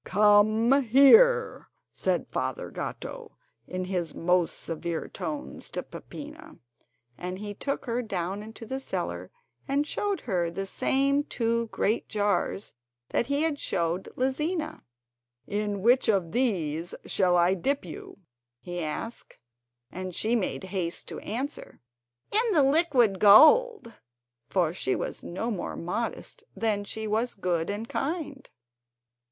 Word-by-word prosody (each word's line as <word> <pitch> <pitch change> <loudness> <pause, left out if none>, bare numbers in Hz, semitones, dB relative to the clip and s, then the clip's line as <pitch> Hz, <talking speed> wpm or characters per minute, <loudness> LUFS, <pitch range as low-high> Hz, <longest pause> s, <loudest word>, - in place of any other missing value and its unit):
"Come 215 +6 +4
here," 445 - +5 0.2
said - - 0
Father - - -3
Gatto, - - -7 0.3
in 185 0 -3
his 180 -4 -3
most 175 0 +2
severe 165 0 -4
tones 295 -1 -6
to - - -4
Peppina. 300 +1 -10 0.6
And 180 +1 -4
he 205 +1 -6
took 275 +7 -3
her 240 0 -1
down 195 -3 -3
into 225 +1 -10
the 265 +4 -4
cellar 270 - -4 0.4
and 285 +1 +1
showed 405 +5 -2
her 180 -7 -1
the 195 +3 -4
same 275 +7 +1
two 230 -3 -1
great 220 +1 -1
jars 205 -1 -1 0.4
that 235 - 0
he 280 +2 +1
had 310 -3 0
showed 170 +2 -1
Lizina. 300 +6 -1 0.6
"In 205 -1 -2
which 245 +1 +4
of 190 -6 +1
these 175 - -1
shall 180 -2 +2
I 175 +2 +4
dip 270 +7 -1
you?" 165 - -9 0.4
he 175 +4 -5
asked; 190 +10 -5 0.5
and 185 -1 -6
she 225 +2 +1
made 205 -3 -1
haste 185 -3 -3
to - - -6
answer: 260 +7 -5 0.5
"In 445 +1 +2
the 300 -5 +5
liquid 270 - +3
gold," 390 - +6 0.6
for 175 -4 +1
she 155 -7 -1
was - - -4
no 220 +7 -3
more 195 - -4
modest 230 - -4
than 210 -3 0
she 220 +2 -4
was 220 +3 0
good 175 -3 -1
and 210 +3 -4
kind. 285 -2 -4
220 Hz, 135 wpm, -27 LUFS, 185-275 Hz, 0.6 s, gold